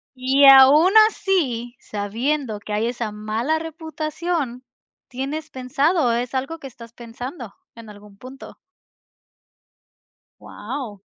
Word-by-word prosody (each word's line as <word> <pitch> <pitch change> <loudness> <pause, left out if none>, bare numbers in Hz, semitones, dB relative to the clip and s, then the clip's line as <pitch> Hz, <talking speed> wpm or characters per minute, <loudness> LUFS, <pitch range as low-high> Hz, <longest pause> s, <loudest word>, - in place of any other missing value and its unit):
Y 265 +2 +3
aún 275 +6 +8 0.2
así, 255 - -2
sabiendo 225 +4 -3
que 210 +1 -7
hay 215 +2 0
esa 235 -3 -4
mala 220 +9 -2
reputación, 315 -4 -4 0.4
tienes 280 +5 -5
pensado 275 +2 0
es 240 +2 -3
algo 270 +5 -3
que 275 - -9
estás 230 -2 -14
pensando 240 - -9 0.2
en 230 -1 -12
algún 205 -1 -15
punto. 260 +5 -12 1.9
Guau. 225 -1 -7
255 Hz, 110 wpm, -21 LUFS, 230-300 Hz, 1.9 s, aún